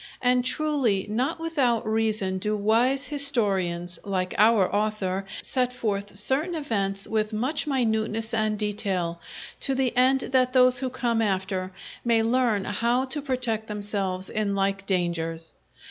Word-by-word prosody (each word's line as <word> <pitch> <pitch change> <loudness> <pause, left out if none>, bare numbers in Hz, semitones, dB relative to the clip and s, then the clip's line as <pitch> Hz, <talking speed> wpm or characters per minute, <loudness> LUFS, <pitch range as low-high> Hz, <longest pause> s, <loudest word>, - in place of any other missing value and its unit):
And, 250 0 +3
truly, 255 -8 0
not 260 +10 -1
without 270 -9 0
reason 215 -4 0
do 210 +2 -1
wise 235 +6 +2
historians, 195 - +1
like 185 -2 -2
our 215 -3 +5
author, 205 -2 -1 0.2
set 250 -1 +1
forth 205 -5 -3
certain 285 - 0
events 200 -10 -1
with 215 0 -1
much 265 +9 -1
minuteness 225 -4 0
and 215 -1 0
detail, 195 -5 -2 0.4
to 270 - -1
the 260 -2 0
end 260 +2 +4
that 255 -1 +3
those 255 -1 +5
who 260 -1 -2
come 240 -2 0
after 190 -2 -1 0.3
may 230 -2 +2
learn 230 -4 +1
how 235 +5 0
to 290 +3 -2
protect 245 -5 -2
themselves 200 -3 -2
in 205 -2 -1
like 195 0 -1
dangers. 165 -3 -1
220 Hz, 140 wpm, -25 LUFS, 195-255 Hz, 0.4 s, our